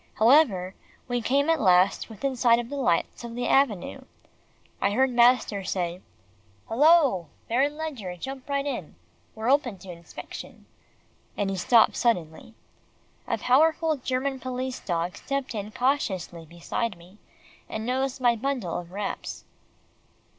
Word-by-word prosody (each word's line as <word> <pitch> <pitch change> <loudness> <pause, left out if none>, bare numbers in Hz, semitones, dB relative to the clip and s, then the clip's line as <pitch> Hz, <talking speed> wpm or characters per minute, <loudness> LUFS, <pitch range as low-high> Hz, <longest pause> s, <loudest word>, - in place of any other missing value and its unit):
However, 220 - +4 0.3
we 245 -1 -1
came 280 +5 +1
at 325 -2 +2
last 185 +2 +3
within 260 +5 -3
sight 235 -2 +4
of 240 0 -4
the 285 - -5
lights 240 -6 0
of 235 -1 -7
the 245 0 -2
avenue. 255 -9 +1 0.8
I 200 - +2
heard 260 +3 +2
master 240 -4 +3
say, 180 -1 -3 0.7
"Hello! 280 - +4 0.2
Baron 275 +6 +1
Ledgar, 260 - -5
jump 265 +8 -7
right 280 0 0
in. 245 - -5 0.4
We're 225 +3 0
open 260 -7 +1
to 185 0 -10
inspection," 170 -1 -10 0.7
and 195 -1 0
he - - -2
stopped 225 +5 +4
suddenly. 200 -2 -1 0.7
A - - 0
powerful 315 +4 +3
German 265 0 -2
police 255 0 -4
dog 175 +2 -2
stepped 275 -2 -3
in 210 -1 -5
cautiously 190 - -1
beside 175 +5 -3
me, 180 +5 -18 0.5
and 220 0 -4
nosed 265 +2 -1
my 240 -2 +3
bundle 240 -8 -2
of 175 0 -11
wraps. 200 +2 -5
240 Hz, 140 wpm, -26 LUFS, 190-270 Hz, 0.8 s, However